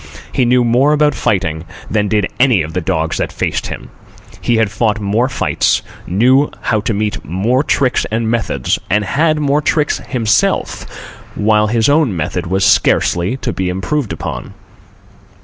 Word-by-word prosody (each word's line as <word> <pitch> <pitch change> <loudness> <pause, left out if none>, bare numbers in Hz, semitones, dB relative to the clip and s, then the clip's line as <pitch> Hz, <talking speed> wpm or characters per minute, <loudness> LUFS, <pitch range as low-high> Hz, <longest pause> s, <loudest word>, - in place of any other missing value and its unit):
He 130 - +2
knew 125 +1 +3
more 125 +5 +3
about 150 -1 +3
fighting 90 -9 -1 0.2
than 105 -1 0
did 105 -1 +1
any 125 -9 +4
of 80 +1 -7
the 90 - -1
dogs 80 -2 -1
that - - -2
faced - - -2
him. - - -8 0.5
He 120 - +1
had 110 -3 +1
fought 110 -1 0
more 110 +5 0
fights, 135 - 0 0.2
knew 130 +10 +3
how 110 -2 0
to 110 - -1
meet 105 +2 -2
more 100 - 0
tricks 135 -4 +1
and 110 +1 -1
methods, 110 - -1
and 105 +2 +1
had 155 +8 +1
more 145 0 +1
tricks 150 0 0
himself, 115 -5 0 0.5
while 105 0 +2
his 115 0 +1
own 145 - +2
method 85 +2 -3
was 95 +2 +1
scarcely 90 +9 +2
to 130 - -3
be 95 -1 -2
improved 100 - -2
upon. 80 - -6
110 Hz, 165 wpm, -15 LUFS, 95-130 Hz, 0.5 s, any